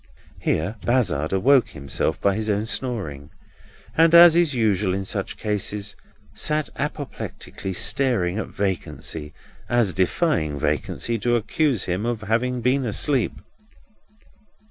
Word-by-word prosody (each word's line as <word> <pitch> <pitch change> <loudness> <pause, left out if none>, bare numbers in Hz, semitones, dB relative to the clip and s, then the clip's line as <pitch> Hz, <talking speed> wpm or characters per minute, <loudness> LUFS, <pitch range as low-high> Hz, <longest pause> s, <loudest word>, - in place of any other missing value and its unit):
Here 90 +9 -1
Bazzard 90 - +1
awoke 125 +6 +4
himself 70 -4 -2
by 100 - +2
his 110 +2 -2
own 105 +1 0
snoring; 100 - -3 0.7
and, 165 +1 +5
as 170 -1 +9
is 170 -5 +3
usual 105 -5 +1
in 95 0 -3
such 100 0 -3
cases, 105 -1 -2 0.4
sat 155 0 -1
apoplectically 145 -9 -5
staring 105 -2 +1
at - - -3
vacancy, 85 -5 -4 0.4
as 120 -6 +2
defying 95 - 0
vacancy 115 +10 -1
to 120 +3 +1
accuse 125 - 0
him 95 +5 -2
of 120 -3 -2
having 120 +4 0
been 130 +3 +2
asleep. 125 +2 0
110 Hz, 120 wpm, -23 LUFS, 95-130 Hz, 0.7 s, as